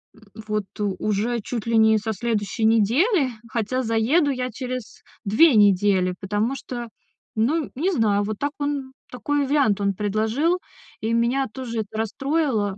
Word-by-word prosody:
м, 225 - -20 0.3
вот, 210 -1 -1
уже 210 +3 -1
чуть 230 +1 -5
ли 230 -1 +1
не 220 0 +5
со 220 +1 -2
следующей 220 0 -1
недели, 255 - +3 0.2
хотя 235 +3 -1
заеду 245 +7 +2
я 255 -1 -2
через 255 0 -6 0.2
2 245 +8 +5
недели, 195 -2 +4
потому 210 +6 -1
что, 240 -2 -6 0.5
ну, 280 +8 +1
не 340 +9 0
знаю, 210 - +2
вот 210 +1 -3
так 285 0 -1
он, 285 -2 -3 0.2
такой 290 +3 -1
вариант 265 -8 +2
он 200 0 +1
предложил, 220 - 0 0.4
и 225 +1 -1
меня 240 +4 +1
тоже 235 -2 -5
это 215 0 -8
расстроило. 225 -3 -1
230 Hz, 150 wpm, -23 LUFS, 210-270 Hz, 0.5 s, не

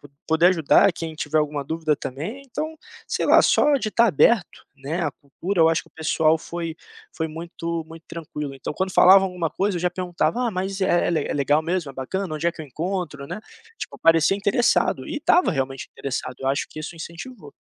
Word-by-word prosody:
po 145 - -15 0.2
poder 160 +2 +4
ajudar 180 +2 +4
quem 165 -1 -6
tiver 155 0 -1
alguma 150 -2 -1
dúvida 160 0 -1
também 170 - -6
então, 310 +5 -5 0.3
sei - - -1
lá, - - +6
só 295 0 +4
de 220 - -2
estar 230 +2 +3
aberto, 205 - +2
né, 140 +6 -4
à 145 - 0
cultura 165 +7 -4
eu 160 - +6
acho 165 - 0
que - - -22
o - - -36
pessoal 160 0 +2
foi 165 0 -6 0.4
foi 160 - -1
muito 165 +1 -5
muito 165 0 -12
tranquilo, 150 -4 -6
então, 135 +2 -6
quando 190 0 -2
falavam 195 +1 +7
alguma 180 -3 -2
coisa, 195 -1 -1
eu - - -5
já 180 - +2
perguntava: 180 +6 -1
"Ah, - - -1
mas 190 0 -3
é 175 -2 +2
é - - +1 0.2
legal 145 +2 +2
mesmo, 170 -3 -2
é - - -14
bacana, 165 +6 -3
onde 155 +3 -2
é 170 - +2
que 160 - -11
eu 155 - -7
encontro", 165 -1 -4
né, 215 - -6 0.4
tipo, - - -7
parecia 165 +3 +4
interessado, 205 +4 +1
e 315 - -4
estava 355 - +3
realmente 135 -4 -3
interessado, 130 -1 -4
eu 135 - -4
acho 140 - 0
que - - -11
isso 160 +2 -6
incentivou. 170 - -9
165 Hz, 210 wpm, -23 LUFS, 150-190 Hz, 0.4 s, falavam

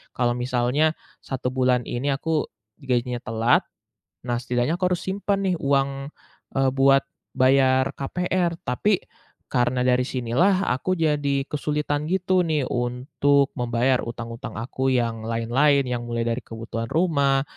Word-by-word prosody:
Kalau 120 -1 +1
misalnya 125 +5 +1 0.3
1 130 -2 -3
bulan 125 -1 +2
ini 135 +4 -1
aku 155 +2 -1 0.3
gajinya 125 -2 -1
telat, 115 +1 +2 0.6
nah, 120 - 0
setidaknya 125 +5 0
aku 185 -1 +1
harus 175 - -3
simpan 195 +1 -1
nih 185 - +1
uang, 140 0 0 0.5
eee, 135 -1 +2
buat 135 0 +5 0.3
bayar 130 0 +4
KPR. 175 +3 -1
Tapi 190 +11 +1 0.5
karena 125 0 +1
dari 125 0 +3
sinilah 155 +12 +1
aku 160 +9 -1
jadi 145 -4 +1
kesulitan 150 0 -1
gitu 185 0 +2
nih 150 -5 0
untuk 135 +3 +1
membayar 120 +1 +1
utang-utang 115 0 -7
aku 130 +3 -2
yang 115 -3 0
lain-lain, 130 +5 +2
yang 120 -1 -2
mulai 115 0 -1
dari 115 +2 -1
kebutuhan 115 0 -5
rumah, 140 -5 +2
135 Hz, 135 wpm, -24 LUFS, 120-150 Hz, 0.6 s, buat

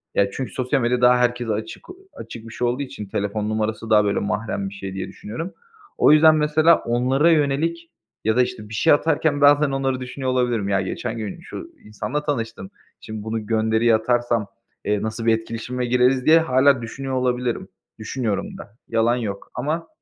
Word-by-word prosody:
ya 100 0 +2
çünkü 130 -3 -5
sosyal 130 +1 -1
medya 120 +1 +1
daha 125 0 +6
herkese 120 -1 0
açık 110 +1 -6 0.3
açık 115 0 -9
bir 110 - -10
şey 125 - -1
olduğu 125 +4 -1
için 105 -5 -8
telefon 105 +2 -2
numarası 110 +1 -2
daha 105 -1 +5
böyle 100 - +1
mahrem 100 0 -2
bir - - -12
şey 95 -1 -7
diye 95 -1 -4
düşünüyorum. 120 - -7 0.4
O - - +5
yüzden 155 +1 +7
mesela 155 +2 +4
onlara 130 +7 +2
yönelik 160 +3 0 0.3
ya 110 +1 +1
da 125 - +4
işte 105 -3 -6
bir - - -9
şey 160 +8 +4
atarken 150 -1 +1
bazen 145 0 +5
onları 135 -1 -1
düşünüyor 130 +1 -4
olabilirim. 120 -5 0
Ya 100 -1 +2
geçen 115 +5 -4
gün 110 - -5
şu 335 - -9
insanla 145 +8 -4
tanıştım, 115 -9 -3 0.3
şimdi 110 -1 -7
bunu 110 -1 -4
gönderiyi 110 +1 +2
atarsam, 120 -1 0 0.4
eee, 105 -1 0
nasıl 110 +1 -4
bir 115 - +5
etkileşime 115 +2 -5
gireriz 125 +1 +2
diye 160 +1 +7
hâlâ 130 -3 +3
düşünüyor 135 +3 -5
olabilirim. 125 -1 -1 0.3
Düşünüyorum 130 - -3
da, 110 - -13
yalan 115 +1 +2
yok. 105 -5 -5
Ama 155 +6 -2
120 Hz, 180 wpm, -22 LUFS, 110-135 Hz, 0.4 s, yüzden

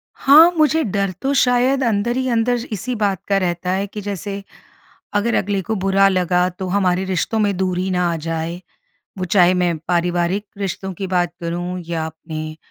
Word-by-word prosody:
हाँ, 310 +5 +7
मुझे 315 +1 +3
डर 200 -2 -1
तो 275 +1 0
शायद 255 +1 +3
अंदर 235 +1 0
ही 260 0 -1
अंदर 240 +1 +1
इसी 220 +5 -3
बात 200 -4 0
का 200 -1 +2
रहता 180 -1 -1
है 195 +2 -1
कि 210 +1 -7
जैसे, 200 0 -5 0.7
अगर 210 +3 +1
अगले 200 0 0
को 220 +4 -3
बुरा 195 0 +3
लगा 180 -1 +2
तो 185 +1 -6
हमारे 185 -1 +1
रिश्तों 190 +4 -1
में 205 -2 +1
दूरी 185 0 -1
ना 180 -1 +1
आ - - -1
जाए। 165 +2 -4 0.6
वो 185 - -1
चाहे 180 0 +4
मैं 175 -2 +1
पारिवारिक 175 +3 0
रिश्तों 190 -1 -4
की 195 - -3
बात 175 -2 0
करूँ 175 +2 -3
या 165 -1 -2
अपने 155 -1 -7
190 Hz, 180 wpm, -20 LUFS, 175-210 Hz, 0.7 s, हाँ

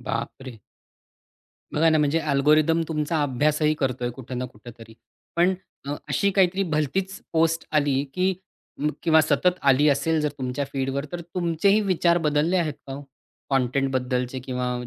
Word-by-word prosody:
बाप - - -3
रे! 130 -3 -9 1.2
बघा 165 +2 +4
ना. 155 - +3
म्हणजे 150 +1 +2
अल्गोरिथम 155 +2 +3
तुमचा 155 0 -1
अभ्यासही 150 +3 +1
करतोय 125 -3 -1
कुठे 130 +1 -9
ना 125 +1 -2
कुठेतरी. 115 -1 -13 0.4
पण 175 +2 +3 0.3
अ, 145 - -2
अशी 200 - +2
काहीतरी 190 0 +2
भलतीच 185 +4 -1
पोस्ट 165 0 +2
आली, 145 -3 +2
की 185 +1 +1 0.7
किंवा 160 -2 +5
सतत 175 +5 +2
आली 140 +2 +4
असेल 160 +3 +1
जर 150 - +1
तुमच्या 130 +2 -3
फीडवर 135 +1 -2
तर 175 - -4
तुमचेही 175 +4 +1
विचार 175 -3 +2
बदलले 155 +2 +1
आहेत 160 -4 0
का 135 - -5
हो? 140 - -7 0.5
कंटेंटबद्दलचे 130 -1 0
किंवा 125 0 -3
150 Hz, 145 wpm, -24 LUFS, 135-165 Hz, 1.2 s, किंवा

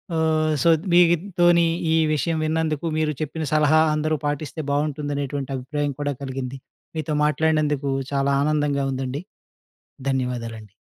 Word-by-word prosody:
ఆహ్, 155 -1 +2
సో, 170 - +5 0.2
మీతోని 175 0 +4 0.3
ఈ - - +4 0.2
విషయం 160 +2 0
విన్నందుకు, 155 0 -1
మీరు 155 -1 +1
చెప్పిన 155 +1 -3
సలహా 155 +1 +4
అందరూ 155 +1 0
పాటిస్తే, 145 +2 -3
బాగుంటుందనేటువంటి 145 -1 -2
అభిప్రాయం 145 +2 -2
కూడా 145 0 -1
కలిగింది. 130 0 -5 0.4
మీతో 155 0 -2
మాట్లాడినందుకు 150 -1 +1 0.2
చాలా 140 0 +1
ఆనందంగా 145 -2 +1
ఉందండి. 130 +3 -3 0.9
ధన్యవాదాలండి. 115 -5 -3
150 Hz, 115 wpm, -23 LUFS, 140-155 Hz, 0.9 s, సో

